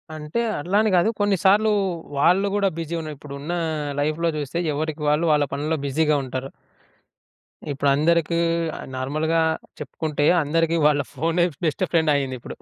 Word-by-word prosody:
అంటే 150 +8 -4 0.2
అట్లాని 205 +7 +2
కాదు. 180 +6 +4
కొన్నిసార్లు 205 +2 +3 0.5
వాళ్ళు 185 +7 +3
కూడా 200 -1 +2
బిజీ 165 +1 -4
ఉన్న 155 -1 -6
ఇప్పుడున్న, 145 +4 -6 0.5
లైఫ్‌లో 155 +3 0
చూస్తే 150 +3 -3
ఎవరికి 155 +1 -3
వాళ్ళు 150 +3 +2
వాళ్ళ 150 -1 +3
పనుల్లో 155 +3 -1
బిజీగా 150 +2 +2
ఉంటారు. 130 +1 -5 1.2
ఇప్పుడందరికి 155 +4 +2 0.6
నార్మల్‌గా 155 +5 0 0.4
చెప్పుకుంటే 150 +1 -3 0.2
అందరికి 165 +2 +1
వాళ్ళ 145 -1 +2
ఫోనే 165 +5 +1 0.2
బెస్ట్ 160 +4 0
ఫ్రెండ్ 160 -3 +3
అయిందిప్పుడు. 130 -3 -4
155 Hz, 125 wpm, -23 LUFS, 145-170 Hz, 1.2 s, కాదు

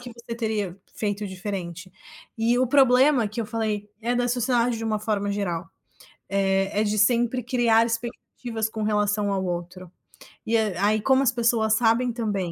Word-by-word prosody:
que 245 0 -9
você 235 0 -8
teria 215 -5 -2 0.2
feito 205 -1 -2
diferente. 185 -2 -6 0.5
E 235 +2 +2
o 255 - +3
problema 260 -2 +4
que 215 - -10
eu - - -2
falei 215 -2 -3
é 240 +2 -1
da 245 0 +1
sociedade 245 -1 +1
de - - -6
uma 215 -1 0
forma 205 -1 -1
geral, 175 -5 -3 0.6
eh, 195 0 +1
é - - +2
de 210 0 -1
sempre 240 +3 +2
criar 235 -2 +3
expectativas 230 -1 -4
com 220 0 -5
relação 210 -1 +1
ao 190 -1 -1
outro. 175 0 -5 0.6
E 230 +1 +2
a 205 -2 0
aí, 215 0 +2
como 265 +3 +3
as 250 - +3
pessoas 230 -2 +2
sabem 235 +2 +2
também, 205 -7 -2
220 Hz, 175 wpm, -24 LUFS, 200-235 Hz, 0.6 s, problema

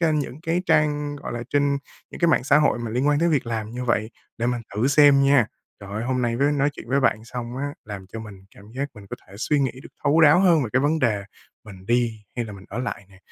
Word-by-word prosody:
trên 160 -3 +2
những 140 0 -5
cái 170 +2 -1
trang, 150 -2 +1
gọi 140 - -7
là, 120 - -4
trên 140 -1 +2 0.3
những - - -10
cái 170 - +4
mạng 155 - +3
xã 145 +1 +5
hội 150 -5 +2
mà 120 -2 -4
liên 125 +5 0
quan 145 0 +3
đến 170 +2 +2
việc 140 -6 +1
làm 110 -2 -3
như 125 +1 -5
vậy, 110 -2 0 0.3
để 115 - 0
mình 125 -1 -1
thử 110 +5 +1
xem 145 -1 +6
nha. 135 -5 +4 0.3
Trời 100 -1 -10
ơi, 110 +2 -3
hôm 125 0 -1
nay 115 -1 0
với 140 +3 +2
nói 145 0 +1
chuyện 145 - -11
với 135 +3 +2
bạn 110 -4 +1
xong 120 0 -6
á 135 - -3 0.2
làm 100 -3 -8
cho 115 - -5
mình 100 -3 -11
cảm 100 - -15
giác 140 +1 -2
mình 105 -2 -13
có - - -5
thể 100 - -14
suy 145 +6 0
nghĩ 130 -3 +1
được - - -11 0.2
thấu 150 +3 +4
đáo 155 +3 +7
hơn 170 -6 +4
về 120 - -3
cái 130 - +3
vấn 150 +3 +1
đề 105 -7 +1 0.4
mình 95 -2 -13
đi 120 -3 0
hay 120 - -1
là 105 - -8
mình 100 -1 -12
ở 105 - -6
lại 125 -5 -4
nè 95 - -19
125 Hz, 280 wpm, -23 LUFS, 110-145 Hz, 0.4 s, đáo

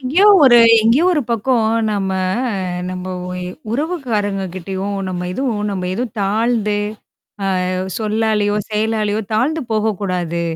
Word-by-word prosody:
எங்கேயோ 310 +11 +3 0.2
ஒரு 240 -2 +7 0.3
எங்கேயோ 240 +10 +4
ஒரு 300 - +1
பக்கம் 230 0 +1 0.2
நம்ம 195 -2 -1 0.8
நம்ம 185 0 -5 0.2
ஒ - - -5
எ - - -4 0.3
உறவுக்காரங்க 230 - -1
கிட்டயும் 190 +2 -4
நம்ம 180 -1 -3
எதுவும் 225 -1 -2
நம்ம 185 -2 -3
எதுவும் 235 0 -4
தாழ்ந்து, 210 +1 +1 0.9
அ - - -1 0.3
சொல்லாலயோ, 215 -1 0 0.2
செயலாலயோ, 215 0 0
தாழ்ந்து 295 +8 +1
போகக்கூடாது. 185 -6 -1
215 Hz, 120 wpm, -18 LUFS, 195-240 Hz, 0.9 s, ஒரு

